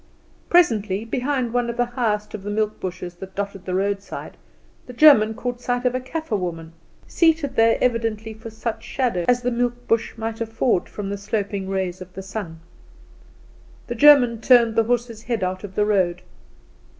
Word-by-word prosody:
Presently, 220 - +3
behind 255 0 -1
one 245 -1 0
of 235 - -5
the 245 - +2
highest 225 -4 -2
of 215 - -6
the 205 - -6
milk 215 0 -1
bushes 180 -1 -5
that 190 +1 -10
dotted 200 -2 -5
the 185 - -2
roadside, 200 +1 -3 0.5
the 250 - -9
German 235 -6 +6
caught 245 +1 -4
sight 245 0 -2
of 250 - +2
a 255 - -1
Kaffer 260 -1 -4
woman, 165 -4 -4 0.3
seated 325 -4 +1
there 225 0 +4
evidently 225 -2 -1
for 220 +1 -10
such 225 +1 -5
shadow 235 -10 -1
as 245 0 +2
the 250 - 0
milk 245 0 -2
bush 230 0 0
might 225 0 -4
afford 225 -3 0
from 200 -1 -5
the 200 - -4
sloping 200 -2 -3
rays 190 -1 -2
of 185 0 -10
the 190 - -6
sun. 190 -5 -7 1.2
The 240 - -4
German 245 -3 +6
turned 235 -3 +5
the 225 - +3
horse's 240 -1 -1
head 230 -4 -2
out 185 +1 -3
of 195 -1 -8
the 210 - +2
road. 185 -4 +1
225 Hz, 180 wpm, -22 LUFS, 195-245 Hz, 1.2 s, German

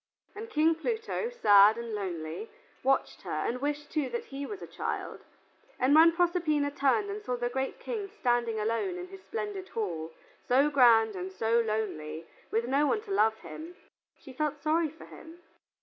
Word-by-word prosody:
And 445 +2 -7
King 320 -4 +3
Pluto, 445 +6 -2
sad 210 - +6
and 235 -1 -5
lonely, 180 - -4 0.3
watched 270 +1 +1
her - - -3
and 250 +2 -2
wished 295 +1 -3
that 325 - -2
he 280 -4 -6
too - - -9
was 405 -2 -7
a - - -5
child, - - -5 0.6
and 260 +3 +3
when 325 +2 +8
Proserpina 335 -4 +1
turned 285 +9 +1
and 415 +1 -5
saw 250 -11 -2
the 240 0 -1
great 265 +2 -3
King 420 -5 -4
standing 240 - 0
alone 230 - -1
in 360 0 -7
his 385 0 -11
splendid 415 -3 -5
hall, 170 -7 -3 0.4
so 275 +4 +4
grand 230 -6 +5
and 185 +1 -5
so 225 +5 +1
lonely, 170 -9 -3 0.2
with 230 +1 0
no 280 +3 +2
one 425 - +1
to 425 -2 -10
love 220 - +2
him, 330 +3 -9 0.4
she 265 - -12
felt 300 +2 -1
sorry 320 +1 +2
for 320 - -13
him. 325 +1 -13
285 Hz, 180 wpm, -29 LUFS, 225-360 Hz, 0.6 s, when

